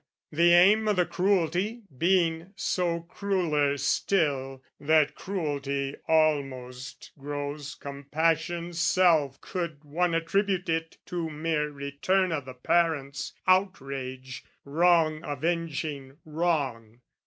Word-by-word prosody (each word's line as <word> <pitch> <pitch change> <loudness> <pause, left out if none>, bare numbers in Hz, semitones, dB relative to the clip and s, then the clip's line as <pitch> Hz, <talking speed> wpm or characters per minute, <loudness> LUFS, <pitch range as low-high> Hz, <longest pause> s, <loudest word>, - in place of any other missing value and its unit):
The 170 +3 +4
aim 205 +5 +6
o' 210 - +3
the 180 -2 +2
cruelty 190 +5 0
being 170 +2 +1
so 175 -3 -1
crueller 165 -6 0
still, 135 -3 0 0.2
That 155 0 +3
cruelty 140 -7 -3
almost 135 -5 -1
grows 145 +1 -5
compassion's 160 +4 -2
self 165 -6 +3
Could 170 -5 -5
one 165 +4 0
attribute 185 +2 0
it 165 0 -2
to 170 -2 -3
mere 155 -1 -1
return 145 +7 0
O' 155 -3 -1
the 130 -1 -10
parents' 140 -1 0
outrage, 135 -9 -1 0.2
wrong 160 +1 +3
avenging 150 -2 -3
wrong. 140 -8 -2
160 Hz, 100 wpm, -27 LUFS, 140-175 Hz, 0.2 s, aim